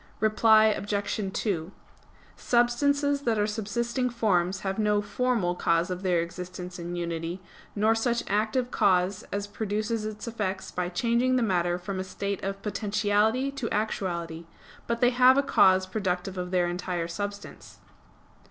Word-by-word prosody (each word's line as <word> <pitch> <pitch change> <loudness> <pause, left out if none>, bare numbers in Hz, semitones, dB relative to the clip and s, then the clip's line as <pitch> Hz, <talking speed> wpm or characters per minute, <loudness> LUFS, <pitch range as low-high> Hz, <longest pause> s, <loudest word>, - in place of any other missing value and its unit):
Reply 220 0 +5
Obj. 205 -1 -1
2: 185 -5 -2 0.6
Substances 285 +4 +2
that 230 -5 0
are 205 - +2
subsisting 235 +4 -2
forms 190 -6 +1
have 195 +1 -3
no 210 -1 +2
'formal' 205 -3 0
cause 170 +1 +1
of 180 0 -4
their 180 -3 +2
existence 180 +1 -7
and 175 +1 -5
unity, 170 +1 -3 0.4
nor 215 +2 +3
such 235 +1 0
active 220 +5 0
cause 185 +1 +2
as 200 0 -2
produces 215 +2 -2
its 215 0 -6
effect 195 -5 -4
by 180 -1 -1
changing 235 +7 +1
the 250 - +2
matter 175 -4 +1
from 190 +1 -5
a - - -1
state 200 +1 -4
of 195 +1 -4
potentiality 215 +5 +1
to 275 -4 -4
actuality; 170 -6 -3 0.4
but 235 0 -2
they 245 0 +5
have 255 +1 +6
a 280 - +4
cause 190 -7 +4
productive 185 -1 -2
of 180 -1 -4
their 180 -1 +2
entire 175 -1 -3
substance. 205 +4 -7
205 Hz, 150 wpm, -27 LUFS, 180-225 Hz, 0.6 s, have